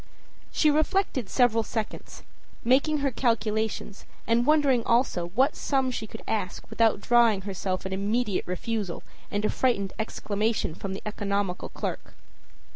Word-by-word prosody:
â - - -25 0.5
She 305 - +3
reflected 305 - +1
several 240 -3 +3
seconds, 220 -1 -5 0.4
making 280 +5 +3
her 275 - +2
calculations 220 -3 -1 0.2
and 235 +2 +2
wondering 285 -6 +4
also 230 -8 +1
what 265 +5 +3
sum 265 -2 0
she 220 -3 -4
could 225 - -10
ask 205 -5 -3
without 225 -3 +2
drawing 235 -4 +4
on - - -15
herself 190 -1 -3
an 190 - -3
immediate 205 +2 0
refusal 195 +1 -3 0.3
and 205 +1 -1
a - - +2
frightened 200 -7 0
exclamation 215 -3 -1
from 190 +3 -5
the - - -8
economical 200 -3 -2
clerk. - - -5
225 Hz, 145 wpm, -27 LUFS, 200-245 Hz, 0.5 s, wondering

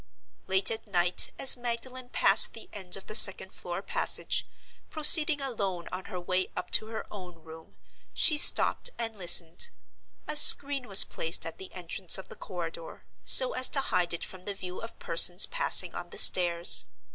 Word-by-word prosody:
Late 190 +2 -1
at 225 0 -8
night, 175 -2 +1
as 270 - +3
Magdalen 245 +1 -8
passed - - +3
the - - -13
end 190 -2 -6
of 195 - -15
the - - -11
second 195 -3 +4
floor 175 +2 -9
passage, - - -4 0.4
proceeding 310 -1 +2
alone 200 -10 -7
on 185 +1 -9
her 180 - -10
way 185 +1 -5
up - - -9
to 215 - 0
her 220 0 -10
own 180 -4 -13
room, 160 0 -17 0.4
she 320 - +1
stopped 295 - +6
and 225 -1 -7
listened. 175 - 0 0.6
A 300 - -6
screen 280 -3 +4
was 195 -1 +6
placed 165 +1 -2
at 165 - -10
the 190 - -13
entrance 180 +1 0
of 190 - -12
the - - -14
corridor, 170 -3 -11 0.2
so 255 -1 +2
as 255 0 +3
to 275 - -4
hide 180 -9 -3
it 170 - -5
from 185 -1 -15
the 205 - -7
view 180 -2 -11
of 230 - -13
persons 175 +2 +2
passing - - 0
on - - -10
the - - -11
stairs. 175 - +3
190 Hz, 180 wpm, -25 LUFS, 175-245 Hz, 0.6 s, stopped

